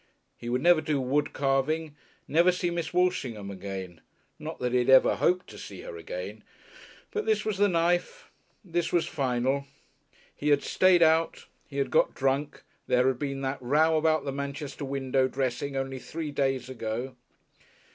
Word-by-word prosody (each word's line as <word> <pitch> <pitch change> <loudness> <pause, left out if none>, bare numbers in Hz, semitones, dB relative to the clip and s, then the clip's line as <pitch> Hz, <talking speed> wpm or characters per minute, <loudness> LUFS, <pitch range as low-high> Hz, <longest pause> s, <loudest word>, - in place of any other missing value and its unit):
He 120 - -7
would 125 +2 0
never 175 -2 +6
do 150 -2 0
wood 135 +3 0
carving, 145 +3 0 0.3
never 170 +4 +4
see 175 -1 -1
Miss 170 -1 -3
Walshingham 130 - 0
again. 95 -3 -7 0.4
Not - - -6
that 125 -1 -2
he 125 - +3
had 125 - 0
ever 130 0 +6
hoped 180 +1 +2
to - - -11
see - - -9
her - - -8
again. - - -7 0.7
But 430 0 -3
this 435 - +1
was 210 -3 -2
the 205 - +5
knife, 175 - 0 0.3
this 175 -1 -1
was 170 -2 +2
final. 135 +1 -1 0.7
He 150 - -1
had 145 -1 +4
stayed 185 -2 +4
out, 160 +1 +2 0.2
he 140 - -7
had 140 - 0
got - - +3
drunk, 135 +2 -1 0.2
there 125 0 +3
had 130 -2 +1
been 140 -2 -3
that 135 0 -3
row 155 +6 +3
about 155 0 +2
the 140 - -2
Manchester 140 +1 -5
window 135 -1 +1
dressing 135 +1 -2
only 135 0 -3
three 155 +2 -5
days 135 -3 0
ago.... 125 +1 -4
140 Hz, 170 wpm, -28 LUFS, 130-165 Hz, 0.7 s, never